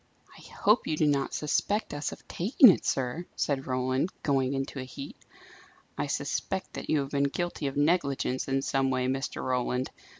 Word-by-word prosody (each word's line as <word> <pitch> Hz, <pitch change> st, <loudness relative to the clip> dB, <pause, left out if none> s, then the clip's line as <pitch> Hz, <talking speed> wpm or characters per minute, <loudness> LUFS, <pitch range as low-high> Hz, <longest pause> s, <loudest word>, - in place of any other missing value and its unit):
"I -, -, -14 dB
hope 210 Hz, +3 st, +1 dB
you 155 Hz, -, 0 dB
do 155 Hz, -, +3 dB
not 140 Hz, -2 st, +1 dB
suspect 205 Hz, +7 st, 0 dB
us 145 Hz, +1 st, -3 dB
of -, -, -12 dB
taking 225 Hz, +7 st, +6 dB
it, -, -, -2 dB
sir!" 135 Hz, +7 st, -1 dB
said 135 Hz, -2 st, -1 dB
Roland, 130 Hz, +5 st, 0 dB
going 135 Hz, -2 st, +1 dB
into 135 Hz, 0 st, -3 dB
a -, -, -3 dB
heat. 130 Hz, +2 st, -8 dB, 0.8 s
"I -, -, -2 dB
suspect -, -, -2 dB
that -, -, -7 dB
you 150 Hz, -, +3 dB
have 135 Hz, 0 st, -5 dB
been 140 Hz, 0 st, +2 dB
guilty 160 Hz, +1 st, -2 dB
of 135 Hz, -, -4 dB
negligence 145 Hz, -4 st, +1 dB
in 135 Hz, 0 st, 0 dB
some 135 Hz, -1 st, +1 dB
way, 130 Hz, -1 st, 0 dB
Mr. 135 Hz, +1 st, -2 dB
Roland. 125 Hz, 0 st, -1 dB
140 Hz, 180 wpm, -28 LUFS, 130-155 Hz, 0.8 s, taking